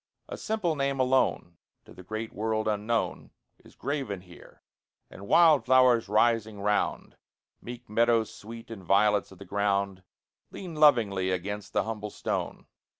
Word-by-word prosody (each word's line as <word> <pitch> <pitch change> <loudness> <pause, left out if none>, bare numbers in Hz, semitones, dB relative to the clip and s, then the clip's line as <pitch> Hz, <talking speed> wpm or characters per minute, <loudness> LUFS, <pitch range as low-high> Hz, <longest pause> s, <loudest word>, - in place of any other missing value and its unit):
A - - -6
simple 210 -7 -2
name 140 -1 -1
alone, 130 -9 +1 0.3
To - - -15
the - - -12
great 110 +4 -6
world 110 0 -1
unknown, 110 +2 -1 0.3
Is - - -18
graven 135 -10 -4
here, 90 -1 -17 0.5
and 100 - -11
wild 160 -1 +5
flowers 125 -4 +4
rising 110 -1 +1
round, 105 +1 -1 0.4
Meek 120 0 -9
meadow 115 +1 +3
sweet 115 +2 -11
and 105 -4 -8
violets 100 +1 +2
of 95 - -14
the 100 - -11
ground, 100 -1 -1 0.5
Lean 180 -3 -8
lovingly 115 -12 +3
against 100 +3 -4
the - - +2
humble 105 -2 -5
stone. - - -4
110 Hz, 145 wpm, -28 LUFS, 100-125 Hz, 0.5 s, wild